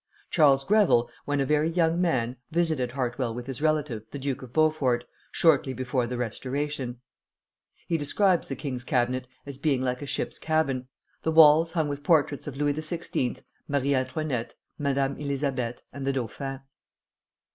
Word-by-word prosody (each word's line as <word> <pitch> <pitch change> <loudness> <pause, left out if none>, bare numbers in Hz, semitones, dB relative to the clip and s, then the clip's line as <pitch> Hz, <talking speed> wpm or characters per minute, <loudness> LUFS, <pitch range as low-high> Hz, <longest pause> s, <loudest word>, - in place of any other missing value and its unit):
Charles 140 -4 +5
Greville, 195 - +4
when 145 0 0
a 135 - +2
very 150 +3 +2
young 165 0 +2
man, 125 -9 +1
visited 160 -7 0
Hartwell 125 -2 -2
with 120 0 -6
his 135 +1 -6
relative, 150 -8 0
the - - -6
Duke 135 -1 -3
of 130 -2 -10
Beaufort, 140 -5 +2 0.3
shortly 145 -5 +3
before 130 -1 -1
the 125 +1 -4
Restoration. 130 +1 -3 0.9
He 165 -2 0
describes 180 +5 +2
the 135 - -4
king's 130 -2 -4
cabinet 125 0 0 0.2
as 140 -2 -7
being 140 -3 +1
like 125 0 -1
a 145 - -5
ship's - - -3
cabin, 140 -5 0 0.3
the - - -1
walls 160 +1 +7
hung 160 -3 +1
with 145 0 -4
portraits 145 -2 +2
of 135 -2 -6
Louis 145 0 +1
XVI., 155 -4 -3 0.2
Marie 140 0 +1
Antoinette, 130 -2 -2 0.2
Madame 140 -1 0
Elisabeth, 135 -4 -2
and 135 0 -5
the 135 - +2
dauphin. 135 +2 -4
140 Hz, 155 wpm, -27 LUFS, 125-155 Hz, 0.9 s, walls